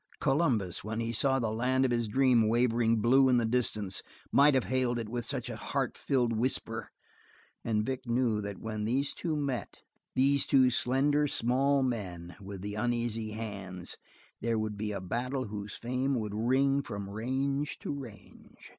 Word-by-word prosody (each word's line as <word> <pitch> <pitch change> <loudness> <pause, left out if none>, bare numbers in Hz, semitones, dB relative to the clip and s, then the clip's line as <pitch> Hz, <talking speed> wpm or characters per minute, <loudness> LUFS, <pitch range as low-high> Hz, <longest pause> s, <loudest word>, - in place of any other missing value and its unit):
Columbus, 130 - +1
when 110 +2 -3
he 115 0 -2
saw 135 +3 +3
the 115 -4 -1
land 130 +4 +1
of 130 - +1
his 120 -1 0
dream 125 -1 +3
wavering 115 0 +2
blue 130 +4 +5
in 125 - +4
the 120 - +2
distance, 110 -5 +1 0.3
might 145 0 +6
have 130 - +3
hailed 130 -2 0
it 115 -2 -3
with 120 +1 -4
such - - -2
a - - -5
heart - - -2
filling 120 -4 0
whisper, 115 -3 -1 0.7
and 110 -2 0
Vic 130 0 -4
knew 120 -3 +1
that 100 -1 -5
when 110 0 -4
these 135 +5 +1
two 165 -3 -2
met, 140 -5 -3 0.4
these 140 +1 +4
two 130 -2 +5
slender, 140 +4 +2
small 135 +2 +2
men 90 -9 -4
with 100 -1 -8
the 105 0 -4
uneasy 115 -1 -1
hands, 100 -5 -5 0.4
there 115 -1 0
would 110 -1 -2
be 105 +1 -3
a 100 - -3
battle 125 +6 -3
whose 105 0 -6
fame 130 +3 -1
would 105 -4 -3
ring 135 +5 +2
from 100 -6 -6
range 135 +7 -2
to - - -4
range. 125 -7 -11
120 Hz, 175 wpm, -30 LUFS, 110-130 Hz, 0.7 s, might